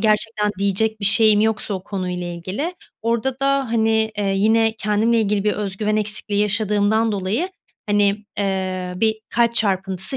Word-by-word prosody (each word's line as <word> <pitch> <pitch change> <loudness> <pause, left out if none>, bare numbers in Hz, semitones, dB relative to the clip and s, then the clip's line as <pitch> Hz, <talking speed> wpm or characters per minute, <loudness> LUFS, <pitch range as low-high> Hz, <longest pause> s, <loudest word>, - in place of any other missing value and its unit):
gerçekten 215 -1 +1
diyecek 205 +3 0
bir 200 - -2
şeyim 210 +1 +5
yoksa 215 -1 0
o 185 - -5
konuyla 180 -3 -4
ilgili 185 - -4 0.3
orada 235 +3 -1
da, 275 0 +2
hani, 220 -1 +2
eee, 205 - 0
yine 220 +2 +3
kendimle 220 +2 +1
ilgili 205 -1 0
bir 210 - +2
özgüven 210 +1 -2
eksikliği 210 -1 -2
yaşadığımdan 210 +1 +2
dolayı, 205 - -1 0.4
hani, 205 0 +1
eee, 185 -2 -2
bir 220 +2 0
kalp 235 0 +2
çarpıntısı 190 +1 0
210 Hz, 150 wpm, -21 LUFS, 200-220 Hz, 0.4 s, şeyim